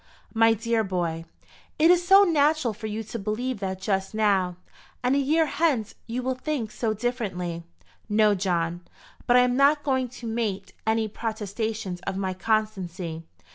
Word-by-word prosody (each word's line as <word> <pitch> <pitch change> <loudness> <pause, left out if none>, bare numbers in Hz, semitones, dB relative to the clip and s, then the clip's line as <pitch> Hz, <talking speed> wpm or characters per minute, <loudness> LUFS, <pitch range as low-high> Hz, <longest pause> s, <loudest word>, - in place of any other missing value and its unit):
"My 225 0 +5
dear 225 0 0
boy, 170 -4 -2 0.5
it 325 +2 +6
is 355 0 +4
so 390 +2 +8
natural 305 - +2
for 220 +1 -6
you 215 +1 -4
to 220 +2 -6
believe 220 +4 -2
that 190 -1 -3
just 195 0 -1
now; 195 -4 +2 0.5
and 250 +1 +2
a - - +3
year 310 +4 +3
hence 285 -8 0
you 245 +2 -3
will 260 +1 0
think 255 -4 -3
so 220 -2 -1
differently!" 195 -8 -3 0.5
"No, 210 0 +4
John. 175 -3 -1 0.5
But 245 0 +6
I - - +7
am 250 0 +2
not 285 +2 +4
going 260 -3 +1
to 240 0 -11
make 210 -4 -3
any 220 0 +2
protestations 215 -3 -4
of 195 -1 -2
my 190 -1 -1
constancy. 185 -5 -2
220 Hz, 165 wpm, -26 LUFS, 195-250 Hz, 0.5 s, so